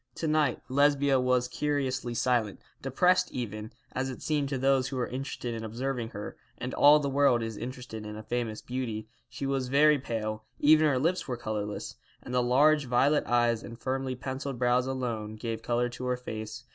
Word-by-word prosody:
To 160 - -2
night 150 -4 +1
Lesbia 140 0 +3
was 125 -1 +2
curiously 130 -3 -1
silent, 115 -3 +1 0.2
depressed 180 +7 +2
even, 110 -3 -5 0.2
as 130 +1 -2
it 130 - -7
seemed 150 -3 0
to 135 - -1
those 135 0 +2
who 135 - -5
were 125 -1 0
interested 130 -2 -4
in 115 -1 -5
observing 120 +1 -3
her; 105 -2 -7 0.2
and 125 +1 -5
all 145 +1 +7
the 145 - -2
world 135 -4 +3
is 115 -1 -4
interested 120 -1 -7
in 105 0 -7
a 110 - -8
famous 115 -2 -3
beauty. 115 -4 -4 0.2
She 140 - -5
was 135 -2 -1
very 145 +3 +5
pale, 110 -3 -3 0.2
even 155 +1 +6
her 140 -3 +2
lips 170 +8 0
were 125 -2 -3
colourless, 105 -3 -4 0.3
and 125 - -7
the 125 - +3
large 145 +4 +4
violet 130 +4 +2
eyes 120 -1 +2
and 115 0 -10
firmly 130 0 -2
pencilled 130 +1 -5
brows 125 +1 +2
alone 115 -5 -3
gave 115 +1 -4
colour 120 0 0
to 125 +1 -7
her 125 0 0
face. 110 -1 -6
125 Hz, 190 wpm, -29 LUFS, 115-135 Hz, 0.3 s, all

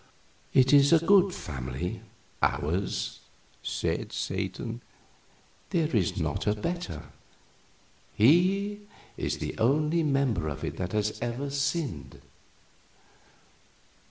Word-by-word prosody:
"It 130 +1 +5
is 140 +1 +7
a 165 - +8
good 195 0 +6
family 65 - -5 0.4
ours," 90 +7 -1 0.4
said - - -2
Satan; 100 +5 -3 0.9
"there 160 -5 0
is 95 -6 +1
not - - -2
a 105 - +3
better. 175 +11 -4 1.1
He 185 - +4 0.4
is - - -2
the - - -4
only 150 +8 +3
member 135 - +1
of 75 -3 -5
it - - -4
that 90 +1 -3
has 105 0 0
ever 120 +4 -3
sinned." 135 - -2
130 Hz, 100 wpm, -28 LUFS, -, 1.1 s, a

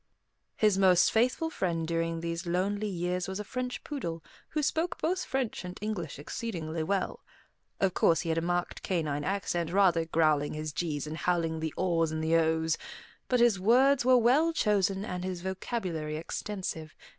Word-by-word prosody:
His 210 -3 +3
most 185 -2 +5
faithful 255 +8 +1
friend 165 - -1
during 165 0 -1
these 170 +1 -4
lonely 200 +4 0
years 180 -1 -2
was 190 +1 -4
a - - -3
French 250 +3 -4
poodle, 170 - -5 0.3
who 305 -1 -1
spoke 335 +4 0
both 365 +4 0
French 265 -7 -2
and 180 +1 -7
English 195 -9 -4
exceedingly 160 0 -4
well. 190 +4 -1 0.6
Of 190 -2 +2
course, 165 -1 +3
he 170 - -4
had 160 - +1
a - - -3
marked 175 +1 -2
canine 155 -6 -1
accent, 175 -2 -1
rather 180 -4 +4
growling 155 -2 +2
his 155 0 -4
g's 150 -1 -2
and 155 +1 -5
howling 165 -2 0
the 160 -1 -2
aw's 165 -3 +1
and 160 0 -2
the 160 +1 +2
ow's, 160 -1 +2 0.5
but 250 - +2
his 235 -5 +4
words 255 +7 +4
were 255 0 +6
well 265 +8 +4
chosen 200 - +1
and 180 -4 -4
his 185 -1 -4
vocabulary 185 -6 -3
extensive. 165 -2 -5
180 Hz, 170 wpm, -29 LUFS, 165-210 Hz, 0.6 s, were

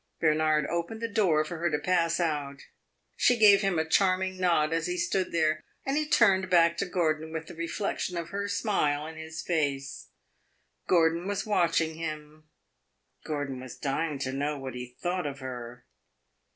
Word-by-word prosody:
Bernard 155 -1 +2
opened 170 +8 -3
the 230 - -2
door 185 -9 +2
for 165 +1 -6
her 170 +1 +1
to 150 - 0
pass 170 0 +1
out; 145 -4 -2 0.5
she 245 - +3
gave 205 -3 +7
him 195 -4 +1
a 160 - +1
charming 185 +1 +2
nod 170 -4 +2
as 165 - 0
he 355 0 -2
stood 340 - 0
there, 155 -2 +1 0.2
and 270 - 0
he 305 0 0
turned 190 -9 +4
back 170 -1 +5
to - - -1
Gordon 160 -3 -1
with 160 0 -4
the - - -10
reflection 175 +2 -3
of 170 0 -4
her 200 +2 -3
smile 195 -8 0
in 160 +1 -8
his 160 0 -7
face. 140 -5 -2 0.8
Gordon 170 +1 +3
was 205 -1 -2
watching 170 -6 +1
him; 155 -1 -7 0.8
Gordon 145 -4 -3
was 130 -1 -9
dying 145 +2 -2
to 130 -1 -3
know 145 +2 -1
what 135 -1 -6
he 125 0 -6 0.2
thought 175 -2 -1
of 140 -1 -5
her. 125 -2 -8
165 Hz, 175 wpm, -28 LUFS, 150-185 Hz, 0.8 s, gave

